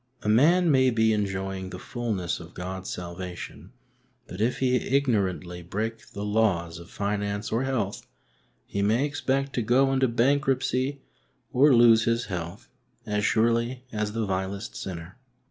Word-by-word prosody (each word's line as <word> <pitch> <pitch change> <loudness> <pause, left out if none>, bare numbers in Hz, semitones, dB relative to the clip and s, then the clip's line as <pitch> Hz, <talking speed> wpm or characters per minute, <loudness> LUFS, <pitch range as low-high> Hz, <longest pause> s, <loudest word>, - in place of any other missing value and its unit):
A - - -4
man 165 +10 +5
may 130 -2 +5
be 110 -2 +3
enjoying 95 -2 -2
the 90 - -7
fulness 105 -5 -3
of 85 0 -12
God's 95 +1 -5
salvation, 90 0 -7 0.5
but 90 +3 -7
if 120 +3 +1
he 125 -1 +2
ignorantly 100 -11 0
break 110 +5 -4
the 100 0 -4
laws 100 -6 +1
of 85 +2 -12
finance 100 0 -2
or 120 +4 +1
health, 115 -7 -2 0.6
he 100 - -3
may 115 +8 +2
expett 135 -1 -1
to 125 - -1
go 130 +4 +3
into 130 0 +3
bankruptcy 130 +2 +1 0.5
or 135 +1 +6
lose 115 -1 +6
his 115 +1 +1
health 85 +2 -5 0.4
as 105 -1 -1
surely 115 +3 +1
as 105 -1 -2
the 115 -1 -1
vilest 95 +2 -3
sinner. 90 +4 -7
110 Hz, 145 wpm, -26 LUFS, 95-125 Hz, 0.6 s, or